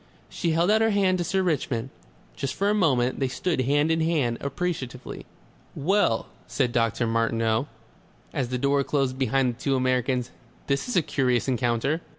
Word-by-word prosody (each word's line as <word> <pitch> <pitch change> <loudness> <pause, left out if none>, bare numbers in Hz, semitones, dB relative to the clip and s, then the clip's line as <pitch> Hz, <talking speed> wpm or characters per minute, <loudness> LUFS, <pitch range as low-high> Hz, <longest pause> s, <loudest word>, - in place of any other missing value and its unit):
She 170 -3 -1
held 170 +5 +3
out 220 +1 +4
her 225 - +4
hand 195 -3 +2
to - - +1
Sir 190 +2 0
Richmond. 135 -7 -1 0.4
Just 135 -2 -3
for 200 +1 +1
a - - +2
moment 130 -11 +2
they 135 - +1
stood 160 +3 -1
hand 145 +4 +2
in 160 0 +1
hand, 150 -8 0
appreciatively.... 140 -4 -4 0.5
"Well!" 170 - +1 0.2
said 125 -4 0
Dr. 120 0 +1
Martineau, 115 +2 +1 0.7
as 135 -6 -1
the 125 - -1
door 140 +2 +2
closed 135 -2 -1
behind 135 -1 +1
the 115 - -18
two 135 0 0
Americans, 125 -1 0 0.3
"This 140 - -1
is 245 - -2
a 175 - +4
curious 125 -4 0
encounter." 125 +5 0
135 Hz, 170 wpm, -25 LUFS, 125-165 Hz, 0.7 s, out